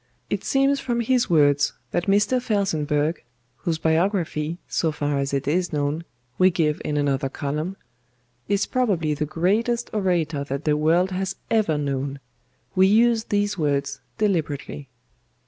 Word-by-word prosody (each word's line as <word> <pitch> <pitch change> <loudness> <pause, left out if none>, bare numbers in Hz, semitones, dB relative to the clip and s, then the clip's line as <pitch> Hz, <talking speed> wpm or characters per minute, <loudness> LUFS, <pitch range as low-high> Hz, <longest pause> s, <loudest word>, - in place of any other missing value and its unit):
It - - -1
seems 275 +1 +2
from 240 -3 -1
his 245 +1 +1
words 145 -3 +3 0.2
that 175 +1 -1
Mr. 205 +6 +3
FELSENBURGH 160 - 0 0.3
(whose 165 -2 -2
biography, 165 -1 0
so 160 - 0
far 145 -1 -1
as 140 0 -1
it 140 -1 -2
is 180 +4 +1
known, 150 +2 -1 0.3
we 185 0 +6
give 160 -3 0
in 150 - -2
another 140 -1 0
column) 150 +8 -3 0.7
is 200 0 +1
probably 195 - 0
the 150 +1 -2
greatest 215 +9 0
orator 170 -8 0
that 140 +2 -4
the 150 -1 +3
world 165 +5 +2
has 190 +1 -2 0.2
ever 210 -9 +2
known 140 -1 -2 0.5
we 190 0 +5
use 225 +2 +4
these 205 -2 0
words 140 -2 -1 0.2
deliberately. 155 -8 -2
165 Hz, 145 wpm, -23 LUFS, 145-205 Hz, 0.7 s, we